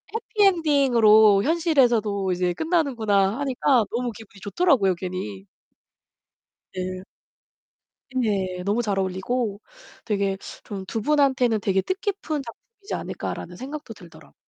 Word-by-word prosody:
해피 445 -2 0
엔딩으로 235 - +5
현실에서도 240 - +2
이제 180 0 0
끝나는구나.' 230 - +1
하니까 260 -3 +2
너무 245 0 -2
기분이 215 -2 -14
좋더라고요, 205 - +2
괜히. 170 - -6 1.3
네. 185 0 -4 1.1
네. 195 -7 -1
너무 210 +4 +1
잘 200 -3 -1
어울리고 200 +3 -2 0.4
되게 200 -3 -1 0.3
좀 195 -2 -6
'2 225 - -3
분한테는 260 -4 +2
되게 190 -1 +1
뜻깊은 375 - -3
작품이지 415 - -10
않을까.'라는 175 +1 -5
생각도 270 -1 -7
들더라고. 175 -5 -16
225 Hz, 290 characters per minute, -24 LUFS, 195-280 Hz, 1.3 s, 엔딩으로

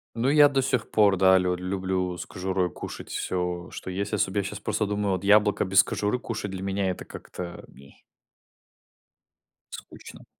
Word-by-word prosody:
Ну 120 +3 +1
я 145 0 +7
до 135 -1 +1
сих 130 -2 -1
пор, 105 -2 +4
да, 95 0 +6
лю 90 -1 +1
люблю 90 0 -2
с - - -6
кожурой 95 -1 -2
кушать - - -8
всё, 90 -1 -3
что - - -7
есть 100 +3 -3
особ 100 -1 0
Я 100 - +2
щас 100 +2 -6
просто 105 0 -1
думаю: 105 -1 -1
"Вот 95 +1 -3
яблоко 105 0 +4
без 95 +1 +5
кожуры 105 +4 -1
кушать 110 -4 -5
для 95 0 -6
меня 95 0 -1
это 90 - -5
как-то 85 -1 -8
ме" 70 0 -17 1.8
Скучно. - - -11
95 Hz, 175 wpm, -26 LUFS, 90-105 Hz, 1.8 s, я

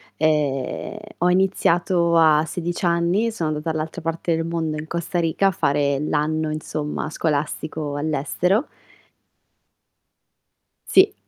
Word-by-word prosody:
e 150 +5 0 0.2
ho 180 +1 +3
iniziato 175 -2 +2
a 155 -2 +5
16 175 +2 -3
anni, 175 +7 +2
sono 165 -8 -2
andata 155 +1 -3
dall'altra 160 +2 -4
parte 165 +1 -1
del 165 0 -2
mondo, 165 -2 -2
in 155 - -7
Costa 170 +2 -2
Rica, 170 +4 +2
a - - +3
fare 140 -4 +1
l'anno, 155 +1 0
insomma, 150 0 -4
scolastico 150 -1 -2
all'estero. 155 - 0 2.2
Sì. 395 +1 +5
160 Hz, 115 wpm, -22 LUFS, 150-175 Hz, 2.2 s, a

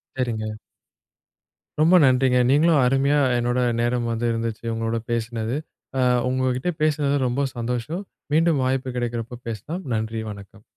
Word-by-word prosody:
சரிங்க. 115 -4 -2 1.3
ரொம்ப 170 +4 +6
நன்றிங்க. 130 -1 +4
நீங்களும் 155 +2 +4
அருமையா 135 +3 +3 0.2
என்னோட 120 +1 0 0.2
நேரம் 120 0 0
வந்து 115 +1 -2
இருந்துச்சு. 115 -1 -3
உங்களோட 115 0 -1
பேசினது. 115 +2 -2 0.4
அ - - +3 0.3
உங்ககிட்ட 130 +5 0
பேசினது 145 -2 +2
ரொம்ப 135 +3 0
சந்தோஷம். 125 - -3 0.3
மீண்டும் 160 -3 +3
வாய்ப்பு 130 -1 -1
கிடைக்கறப்ப 120 0 -4
பேசலாம். 150 - -5
நன்றி, 110 0 -2
வணக்கம். 100 +1 -12
125 Hz, 125 wpm, -23 LUFS, 115-140 Hz, 1.3 s, ரொம்ப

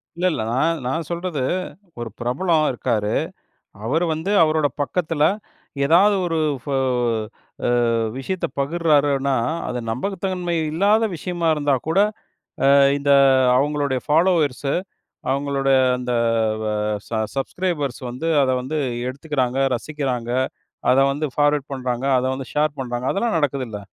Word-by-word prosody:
இல்ல, 175 +2 -2
இல்ல. 110 - -2
நான் 165 +6 +1
நான் 155 +4 -2
சொல்றது. 170 -5 -3 0.6
ஒரு 120 -1 -4
பிரபலம் 155 +6 +1
இருக்காரு. 110 -4 -1 0.7
அவரு 155 +9 +1
வந்து 160 +5 -3
அவரோட 155 -1 +3 0.2
பக்கத்துல 155 0 0 0.6
எதாவது 190 +7 +5
ஒரு 165 -2 -1 0.2
ஃப - - -29 1.3
ஆ - - +1 0.2
விஷயத்த 175 +7 -3
பகிர்றாருன்னா, 140 -3 +2 0.3
அது 125 0 -3
நம்பகத்தன்மை 180 - -2 0.2
இல்லாத 205 +7 +3
விஷயமா 175 0 -2
இருந்தா 145 -2 +1
கூட 165 +4 +2 0.7
ஆ - - +7 0.2
இந்த 140 0 +2 0.4
அவங்களோட 145 0 0
ஃபாலோவர்ஸு 150 -5 +2 0.6
அவங்களோட 140 0 0 0.3
அந்த 125 0 -3 0.6
ஆ - - -1 0.4
ச - - -14 0.2
சப்ஸ்க்ரைபர்ஸ் 145 -2 -2
வந்து, 130 +7 -4
அத 130 - +2
வந்து 135 +5 -4 0.3
எடுத்துக்குறாங்க, 135 -2 -2 0.2
ரசிக்கிறாங்க. 125 -3 -3 0.6
அத 130 - +3
வந்து 150 +2 -2
ஃபார்வர்ட் 145 -1 +1
பண்றாங்க. 130 -1 -3
அத 125 - -1
வந்து 130 -1 -6
ஷேர் 150 0 +1
பண்றாங்க. 120 -1 -3
அதெல்லாம் 215 -1 0
நடக்குதுல்ல? 130 -8 -2
145 Hz, 120 wpm, -21 LUFS, 130-165 Hz, 1.3 s, ஆ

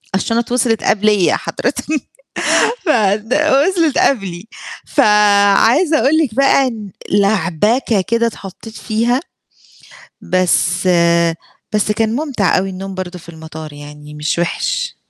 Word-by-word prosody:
الشنط 230 +5 -1
وصلِت 240 -2 0
قبليَّ 210 -3 +2
حضرِتِك، 250 0 -4 1.0
ف 320 - -2 0.3
د 220 +3 -5
وصلِت 305 +1 +2
قبلي 195 -6 -1 0.4
فعايزة 210 - +3
أقول 280 +6 +2
لِك 280 -9 0
بقى 275 0 +3
إن 220 -4 -7 0.2
لعبكة 205 - +1
كده 230 +4 0
اتحطيت 220 0 -9
فيها. 235 +3 0 1.0
بس 180 0 0 0.9
بس 210 0 +1
كان 220 +1 -1
مُمتع 270 -12 0
أوي 190 +1 -2
النوم 190 +1 -7
برضو 185 -1 -6
في 170 - -18
المطار 160 -2 -10
يعني 150 +1 -12
مش 150 +2 -2
وِحِش. 175 0 -2
210 Hz, 115 wpm, -16 LUFS, 185-245 Hz, 1.0 s, فعايزة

